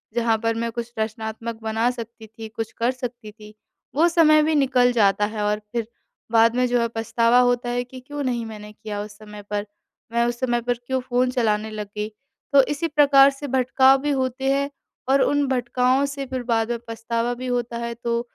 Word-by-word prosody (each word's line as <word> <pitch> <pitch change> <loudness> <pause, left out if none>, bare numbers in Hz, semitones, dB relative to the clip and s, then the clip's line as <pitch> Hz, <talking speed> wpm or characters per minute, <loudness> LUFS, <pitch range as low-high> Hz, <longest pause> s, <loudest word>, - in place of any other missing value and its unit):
जहाँ 230 -2 +2
पर 230 0 +2
मैं 230 0 -2
कुछ 235 0 -5
रचनात्मक 220 +1 -4
बना 225 +2 +1
सकती 230 -2 -9
थी, 220 +1 -9
कुछ 225 +1 -5
कर 235 +2 +1
सकती 245 -3 -7
थी, 210 0 -14 0.4
वो 320 +4 +5
समय 310 -2 +5
भी 315 +1 +1
निकल 260 -3 +3
जाता 205 -2 +3
है 215 - -3
और 210 0 0
फिर 235 -2 -2 0.4
बाद 230 0 +4
में 250 0 +2
जो 245 0 +1
है 235 - +1
पछतावा 230 +2 +3
होता 245 0 +2
है 245 0 -1
कि 255 +1 -11
क्यों 290 +3 -6
नहीं 240 -3 -1
मैंने 210 -1 -9
किया 210 -1 -6
उस 205 0 -9
समय 210 -1 -11
पर, 205 0 -1 0.5
मैं 235 0 +2
उस 240 0 -2
समय 240 -2 0
पर 245 +1 0
क्यों 260 0 0
फ़ोन 250 +1 +2
चलाने 220 -3 0
लग 210 -1 -5
गई? 210 +1 -2 0.4
तो 275 -1 +7
इसी 295 +4 -2
प्रकार 285 -3 +6
से 275 +1 -7
भटकाव 265 +1 +4
भी 295 - -1
होते 265 0 0
हैं 280 0 0 0.4
और 275 0 +4
उन 290 0 +2
भटकाओं 255 +1 +1
से 275 0 -5
फिर 255 -1 -4
बाद 225 0 +1
में 235 - -2
पछतावा 230 +1 -2
भी 255 +1 -6
होता 245 -1 -2
है 235 0 -4
तो 235 0 -2
240 Hz, 210 wpm, -23 LUFS, 225-260 Hz, 0.5 s, तो